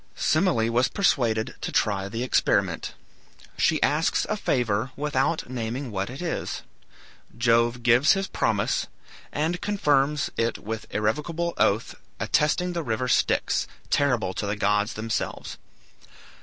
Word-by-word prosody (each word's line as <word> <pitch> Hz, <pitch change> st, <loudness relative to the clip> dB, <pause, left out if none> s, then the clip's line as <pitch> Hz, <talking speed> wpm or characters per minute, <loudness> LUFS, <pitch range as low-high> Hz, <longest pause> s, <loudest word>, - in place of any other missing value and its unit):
Semele 155 Hz, -8 st, +2 dB
was 125 Hz, +2 st, +3 dB
persuaded 120 Hz, -, +1 dB
to -, -, -3 dB
try 100 Hz, -2 st, 0 dB
the 115 Hz, +4 st, -3 dB
experiment. 130 Hz, -, +1 dB, 0.6 s
She -, -, +2 dB
asks -, -, +2 dB
a -, -, 0 dB
favor, 115 Hz, -1 st, 0 dB
without 150 Hz, +2 st, 0 dB
naming 120 Hz, +1 st, -4 dB
what 95 Hz, 0 st, -2 dB
it 135 Hz, +7 st, -7 dB
is. 170 Hz, -, -3 dB, 0.7 s
Jove 120 Hz, 0 st, +2 dB
gives 125 Hz, +4 st, +5 dB
his 195 Hz, 0 st, -1 dB
promise, 110 Hz, -, 0 dB, 0.4 s
and 165 Hz, +4 st, -1 dB
confirms 150 Hz, -8 st, +1 dB
it 115 Hz, 0 st, 0 dB
with 110 Hz, +1 st, -6 dB
the -, -, -12 dB
irrevocable 155 Hz, +10 st, -1 dB
oath, 105 Hz, +3 st, +1 dB, 0.3 s
attesting 180 Hz, +4 st, +1 dB
the 170 Hz, -, -2 dB
river 125 Hz, -2 st, -2 dB
Styx, -, -, +1 dB, 0.2 s
terrible 125 Hz, -9 st, +1 dB
to 105 Hz, -, -3 dB
the 100 Hz, -, -1 dB
gods 105 Hz, +1 st, +1 dB
themselves. 110 Hz, +1 st, -4 dB
125 Hz, 130 wpm, -25 LUFS, 110-150 Hz, 0.7 s, gives